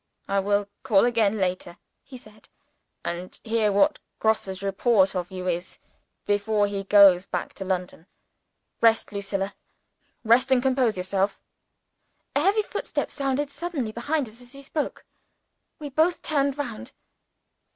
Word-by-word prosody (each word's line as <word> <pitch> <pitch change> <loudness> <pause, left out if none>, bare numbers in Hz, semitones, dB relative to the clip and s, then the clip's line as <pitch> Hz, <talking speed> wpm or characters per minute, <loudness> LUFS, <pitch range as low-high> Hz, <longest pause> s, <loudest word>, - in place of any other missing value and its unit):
"I 195 0 +1
will 205 +1 +1
call 225 -6 +4
again 220 -3 +2
later," 180 -2 -2 0.2
he 260 - -12
said; 215 -3 -16 0.6
"and 175 +2 -5
hear 220 -2 +1
what 200 0 +3 0.2
Grosse's 200 -3 0
report 195 0 +2
of 180 -1 -2
you 185 -1 -6
is, 175 0 -3 0.5
before 205 +1 +1
he 200 -1 -4
goes 195 -3 +6
back - - -4
to 190 - -7
London. 180 -2 -3 0.7
Rest, 225 -2 +4
Lucilla 200 -1 -3 0.7
rest 245 +4 +4
and 260 - +5
compose 255 -4 +1
yourself." 190 +2 -1 1.0
A - - +4
heavy 405 +6 +3
footstep - - -4
sounded 275 0 -1
suddenly 290 -9 -4
behind 280 +5 -1
us 225 +3 -12
as 245 +1 -10
he 275 0 -11
spoke. 295 +2 -4 0.7
We 295 -1 -7
both 320 +5 +1
turned 280 -2 0
round. 245 -7 -5
215 Hz, 140 wpm, -25 LUFS, 195-260 Hz, 1.0 s, goes